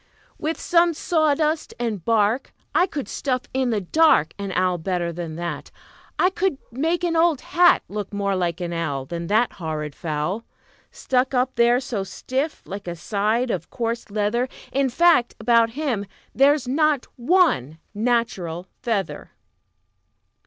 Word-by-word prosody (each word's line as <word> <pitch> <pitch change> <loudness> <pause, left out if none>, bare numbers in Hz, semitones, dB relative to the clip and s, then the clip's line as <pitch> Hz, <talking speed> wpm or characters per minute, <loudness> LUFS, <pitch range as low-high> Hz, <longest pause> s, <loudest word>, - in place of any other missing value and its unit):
"With 320 +1 -2
some 340 -1 +3
sawdust 310 -1 +1
and 220 -7 -2
bark 225 +4 +1 0.2
I 360 - +4
could 285 -7 -5
stuff 255 -2 -2
in 260 -1 +1
the 215 -3 0
dark 190 - +3
An 200 -1 -4
owl 180 -1 +1
better 175 0 -2
than 165 -2 -5
that. 170 +1 -5 0.5
I 365 - +3
could 375 -5 0
make 325 +8 -1
an 340 -1 +1
old 325 -4 +3
hat 350 0 +4
Look 205 -1 -5
more 200 -1 -1
like 175 -2 -1
an 175 -1 -3
owl 145 -5 -2
Than 170 +2 -5
that 220 +5 +2
horrid 155 -3 -5
fowl, 165 +7 -3 0.5
Stuck 260 +1 0
up 255 +1 +1
there 240 +1 +4
so 240 -7 -3
stiff 265 - -3
like 200 -1 -7
a 175 - -3
side 215 +7 0
of 175 -4 -4
coarse 235 -1 -3
leather. 215 +5 0 0.2
In 275 0 +1
fact, 320 -2 +4
about 230 0 +3
him 245 -10 -1 0.3
there's 275 0 +3
not 295 0 +2
one 245 - +2 0.2
natural 205 -7 -1 0.2
feather." 225 -6 -3
230 Hz, 150 wpm, -23 LUFS, 185-275 Hz, 0.5 s, I